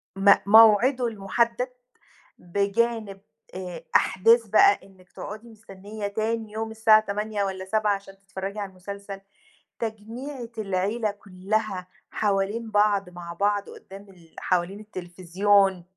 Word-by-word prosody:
م 195 +1 +7
موعده 225 +4 +6
المحدد 230 +4 -1 0.7
بجانب 200 +2 -1 0.3
آآ 180 -3 -7
أحداث 230 +4 +4
بقى 205 -1 +5
إنِّك 185 -2 -21
تقعُدي 215 +3 -9
مستنية 205 -1 -8
تاني 220 +1 -3
يوم 220 +1 -4
الساعة 220 0 +5
20:00 210 0 -2
والّا 190 -1 -4
19:00 210 +1 +1
عشان 195 0 -12
تتفرّجي 195 +1 -6
على 200 -1 -4
المسلسل، 195 +1 -9 0.6
تجميعة 230 +4 -6
العيلة 205 +2 -1
كلّها 200 -1 -3 0.2
حوالين 210 +2 -1
بعض 205 -2 +2
مع 175 -1 -9
بعض 205 +2 0
قدّام 195 +1 -13
ال 170 -4 -20
حوالين 185 +2 -1
التليفزيون. 190 0 0
200 Hz, 115 wpm, -25 LUFS, 195-220 Hz, 0.7 s, م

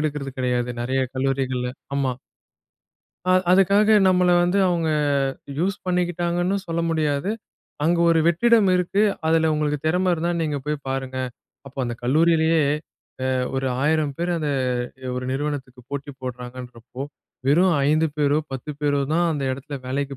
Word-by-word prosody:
எடுக்கிறது 150 -2 -2
கிடையாது. 125 -1 0
நெறையா 130 +2 0
கல்லூரிகள்ல, 130 -2 -1 0.3
ஆமா. 135 -2 +1 1.1
அ 185 - +2 0.2
அதுக்காக 200 +3 +5
நம்மள 180 -1 +3
வந்து 180 +3 +2
அவுங்க 170 -3 0 0.7
யூஸ் 190 +4 0
பண்ணிக்கிட்டாங்கன்னும் 175 +1 0
சொல்ல 170 0 -1
முடியாது. 155 +2 0 0.5
அங்க 170 +2 +3
ஒரு 165 -1 +4
வெற்றிடம் 215 +5 +4
இருக்கு, 180 +3 +1 0.2
அதில 160 0 +3
உங்களுக்கு 150 -1 0
திறமை 180 +3 +2
இருந்தா, 170 +1 -1
நீங்க 150 -2 -1
போய் 150 0 0
பாருங்க. 130 -1 -3 0.5
அப்போ 135 0 -12
அந்த 120 -1 -3
கல்லூரியிலயே 160 +4 +3 0.6
அ - - +1 0.3
ஒரு 135 0 -1 0.2
1,000 155 -1 +1
பேர் 175 +1 -1
அத 155 - -3 0.7
ஒரு 125 0 -3
நிறுவனத்துக்கு 135 -2 -4
போட்டி 140 0 -5
போடுறாங்கன்றப்போ, 125 0 -8 0.4
வெறும் 170 +6 +4 0.2
5 155 +2 +3
பேரோ, 145 0 +2
10 135 +3 -5
பேரோ 145 -1 +1
தான் 175 +1 +3
அந்த 145 -3 -3
எடத்துல 140 +2 -6
வேலைக்கு 140 +1 -2
150 Hz, 135 wpm, -23 LUFS, 135-175 Hz, 1.1 s, அதுக்காக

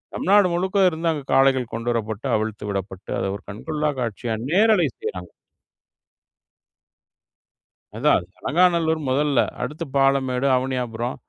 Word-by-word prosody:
தமிழ்நாடு 200 0 +4
முழுக்க 185 +3 -1
இருந்து 165 0 -2
அங்க 150 -3 -4
காளைகள் 135 -2 +3
கொண்டுவரப்பட்டு, 115 0 -2
அவிழ்த்து 110 -1 -3
விடப்பட்டு 95 -1 -6
அத - - -2
ஒரு - - -21
கண்கொள்ளா 150 +9 -2
காட்சியா 115 0 -3 0.2
நேரலை 205 -4 +4
செய்யுறாங்க. 90 -1 -6 2.7
அதான், - - +2
அலங்காநல்லூர் 165 -1 +2
முதல்ல. 140 0 +2 0.2
அடுத்து 150 +5 -4
பாலமேடு, 135 -1 +2
அவனியாபுரம் 125 -2 -3
135 Hz, 105 wpm, -22 LUFS, 115-160 Hz, 2.7 s, தமிழ்நாடு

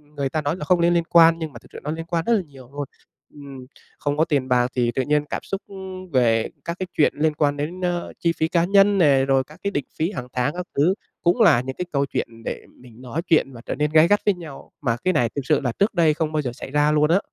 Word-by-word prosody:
người 140 -2 -1
ta 155 +3 -2
nói 145 +2 -1
là 165 - -6
không 180 +2 +3
nên 170 +1 +4
liên 170 -1 +2
quan, 165 -1 +6
nhưng 160 -3 -5
mà - - -10
thực - - -20
sự - - -8
nó 150 - -3
liên 165 +1 -5
quan 170 -1 -1
rất 235 - +2
là 215 - +2
nhiều 135 -7 -15
luôn. 145 0 -4 0.5
Ừm, 140 -3 -10 0.3
không 145 0 -2
có 160 - +3
tiền 145 -5 0
bạc 125 -1 +3
thì 120 -2 +1
tự - - +1
nhiên 150 +2 +1
cảm - - -3
xúc, 195 - -4
ưm, 190 -1 -9
về 115 -4 +2 0.2
các 170 +1 -4
cái 185 - -3
chuyện 150 - +4
liên 155 +1 +1
quan 145 -1 0
đến, 165 +6 -4
ơ, 175 -1 -2
chi 170 - +2
phí 160 - +1
cá 170 0 +1
nhân 200 +1 +4
nè, 140 -7 +4
rồi 135 -1 +2
các 150 +4 -17
cái 200 - -1
định 145 -8 -2
phí 165 +5 0
hàng 125 -11 -6
tháng 130 +3 0
các 180 0 -5
thứ 155 +7 +4 0.3
cũng 175 +6 +2
là 160 - +6
những 130 +1 -6
cái 180 - -4
câu 140 -1 +1
chuyện - - -3 0.2
để - - -4 0.2
mình 120 -1 -15
nói 130 +6 -4
chuyện 155 -5 +3
và 120 - -11
trở - - -3
nên 150 0 -1
gay 155 +1 +6
gắt 205 +2 +3
với 205 - +4
nhau, 165 -6 -11
mà 115 -2 0
cái 185 - +2
này 120 -7 +2
thực 140 - -1
sự 150 0 +3
là 125 -4 -1
trước 200 +3 +2
đây 165 -5 +3
không 155 0 -2
bao 155 -1 0
giờ 125 -4 -3
xảy 130 - -9
ra 150 +1 +3
luôn 150 0 +3
á. 185 - +5
150 Hz, 290 wpm, -22 LUFS, 135-175 Hz, 0.5 s, quan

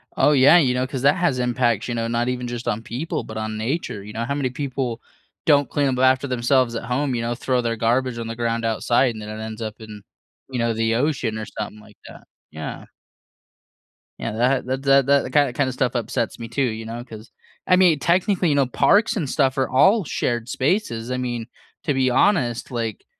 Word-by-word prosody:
Oh, - - +4
yeah, 140 +5 +7
you 135 -7 +3
know 125 +1 0
'cause 130 -1 -5
that 140 +1 +5
has 170 -8 +1
impacts, 120 -3 0
you 120 - -3
know, 115 0 -1
not 120 +1 -1
even 125 -1 -3
just 120 0 -6
on 105 - -1
people, 130 +9 -4
but 110 - -8
on 110 0 -3
nature 110 -2 -3
you 105 +1 -10
know 115 +2 -3
how 140 +3 -2
many 140 -3 -1
people 130 -3 -3 0.4
don't 145 -4 +4
clean 145 -1 +1
up 130 -1 -1
after 130 +1 +3
themselves 125 -1 +1
at - - -4
home, 130 +2 -1
you 115 - -1
know, 120 +1 -2
throw 125 +1 0
their 115 -1 -1
garbage 120 +2 0
on 115 -1 -5
the 115 - -5
ground 115 0 -1
outside, 120 +2 +1
and 110 - -8
then 105 - -7
it 110 +1 -6
ends 110 +1 -7
up 110 -1 -4
in, 105 -2 -10 0.5
you 130 -2 -3
know, 115 0 +1
the 115 0 0
ocean 125 -4 0
or 110 - -5
something 105 0 -5
like 105 -1 -18
that, - - -13 0.3
yeah. 80 0 -7 1.3
Yeah, 115 - -3
that 125 +4 +1
that 130 +1 -2
that 135 -1 +4
that 140 0 +4
ki 145 -4 +3
kinda 130 0 0
stuff 125 0 -1
upsets 115 -1 -2
me 115 - -7
too, 120 +5 -2
you 115 -4 -1
know, 115 +2 -6
'cause 115 -2 -12 0.3
I 185 - +4
mean, 180 -4 +5
technically, 180 +2 +2
you 145 - +2
know, 140 -1 +3
parks 205 - +3
and 160 -10 -2
stuff 135 -2 +1
are 130 - +1
all 195 - +4
shared 120 -5 -2
spaces, 130 - -1
I 125 - -1
mean, 120 -2 -3 0.4
to 145 - +1
be 130 -1 +2
honest, 125 - +1
like, 115 -3 -4
125 Hz, 220 wpm, -22 LUFS, 115-135 Hz, 1.3 s, yeah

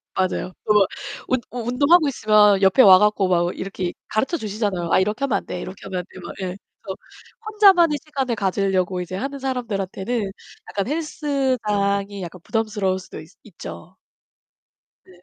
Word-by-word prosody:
맞아요. 185 -1 -1
또 210 - +3
막 205 -2 +5 0.4
운 255 -1 +1 0.3
운동하고 290 +6 +4
있으면 210 -6 +4
옆에 195 +6 +5
와 190 -4 +9
가지고 210 -2 +2
막 180 -1 +3
어 175 - -1
이렇게 185 -2 -4
가르쳐주시잖아요. 210 - -2
"아, - - +5
이렇게 210 +7 -1
하면 270 - +1
안 - - -17
돼, 180 - -5
이렇게 185 +1 -8
하면 185 -2 -4
그거." 180 -2 -10
예. 185 -1 -3 0.3
그래서 190 - -6 0.5
혼자만의 380 -8 +5
시간을 270 -6 -2
가지려고 190 -2 0
이제 180 +1 -6
하는 275 +7 -4
사람들한테는 225 -4 -3 0.4
약간 200 +2 -2
헬스장이 235 - -1
약간 175 +1 -8
부담스러울 210 -4 -1
수도 185 - -10
있어 155 - -14
있죠. 85 - -11 1.1
네. 180 -1 -19
205 Hz, 365 characters per minute, -22 LUFS, 185-255 Hz, 1.1 s, 와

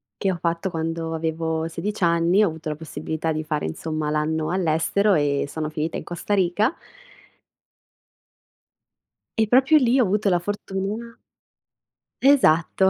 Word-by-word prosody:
che 195 - 0
ho 180 - -3
fatto 170 +2 -1
quando 165 -1 -3
avevo 160 0 -2
16 205 +5 -4
anni, 170 +4 +3
ho - - +3
avuto 160 -1 -6
la 150 - -3
possibilità 160 +1 -4
di 155 0 -2
fare 150 -1 -2
insomma 155 - -3
l'anno 155 +1 -1
all'estero 185 +3 +2
e 145 -2 +1
sono 155 +1 -4
finita 155 +2 -3
in - - -6
Costa 175 +4 -2
Rica 195 - +1 2.7
e - - +6
proprio 265 +6 +5
lì 255 -2 +3
ho - - +5
avuto 205 0 +1
la 175 -2 +2
fortuna 205 +4 -4 1.0
Esatto. 190 - +4
165 Hz, 140 wpm, -23 LUFS, 160-200 Hz, 2.7 s, e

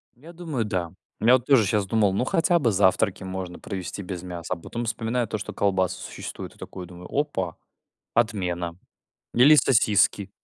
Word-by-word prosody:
Я 155 +8 -14
думаю, 160 -9 -3
да. 90 -5 -2 0.3
Я 115 +3 +5
вот 125 -2 +3
тоже 130 -6 +5
щас 105 +1 +1
думал, 100 -1 +2
ну 110 +6 0
хотя 170 +5 +2
бы 120 -7 +2
завтраки 95 0 +2
можно 95 -1 -5
провести 95 +1 -5
без 90 -2 -6
мяса, 90 -1 -5
а - - -5
потом 115 +8 -5
вспоминаю 115 +1 -1
то, 110 - -3
что 105 - -6
колбасы 95 -2 +1
существуют. - - -7
И - - -23
такой 90 - -8
думаю 90 0 -11
опа, 115 - -1 0.6
отмена. 90 -7 0 0.6
Или 135 +6 +7
сосиски. 105 -6 +3
100 Hz, 175 wpm, -25 LUFS, 90-120 Hz, 0.6 s, Или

